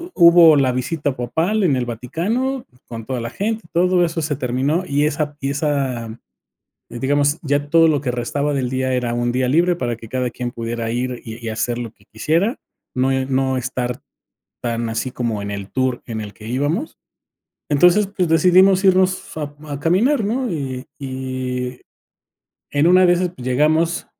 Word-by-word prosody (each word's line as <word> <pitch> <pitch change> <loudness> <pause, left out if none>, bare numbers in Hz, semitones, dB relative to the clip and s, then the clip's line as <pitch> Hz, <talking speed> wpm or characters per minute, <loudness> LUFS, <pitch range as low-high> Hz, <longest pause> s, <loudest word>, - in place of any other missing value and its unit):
hubo 170 -2 +8
la 135 -2 +3
visita 135 +2 -2
papal 165 - 0
en 155 -7 +3
el 125 -1 -1
Vaticano, 205 - -2 0.2
con 115 -1 -7
toda 130 -2 -3
la 115 - -4
gente, 220 - -3
todo 180 +1 +3
eso 165 -1 -1
se 145 -1 -1
terminó, 135 +6 0
y 145 +1 +1
esa 150 -1 -1
y 135 -1 -2
esa 135 -6 -2 0.7
digamos, 145 +5 +1
ya 145 0 0
todo 165 +1 +5
lo 145 -3 +2
que 135 - -3
restaba 140 +4 -2
del 130 -3 -1
día 130 0 -1
era 125 -2 -1
un 120 0 0
día 125 +1 0
libre 170 +6 +3
para 120 -8 -2
que 115 0 -12
cada 125 +1 -1
quien 120 -1 -4
pudiera 115 -1 -4
ir 125 +1 -2
y 115 +1 -8
y 115 - -2
hacer 120 +2 -2
lo 115 -2 -5
que 100 -2 -28
quisiera, 165 - 0 0.4
no 130 +1 +2
no 130 0 0
estar 125 0 -3 0.6
tan 115 -1 -2
así 115 +3 -2
como 115 -5 -2
en 100 0 -5
el 100 -1 -6
tour 130 0 0
en 115 -2 -4
el 105 -1 -8
que 110 - -12
íbamos, 145 - -2 0.7
entonces, 180 +8 +5
pues, 190 -3 -1
decidimos 185 +4 +5
irnos 185 -3 +2
a 145 -1 -4
a 145 -1 -5
caminar, 215 - +2
¿no? 245 +3 -1
Y 135 -5 -4
y 130 -1 -4 0.9
en 145 +3 +2
una 185 +1 +6
de 175 - +5
esas, 180 +1 0
pues, 125 - -9
llegamos 155 +6 +1
135 Hz, 180 wpm, -20 LUFS, 125-170 Hz, 0.9 s, hubo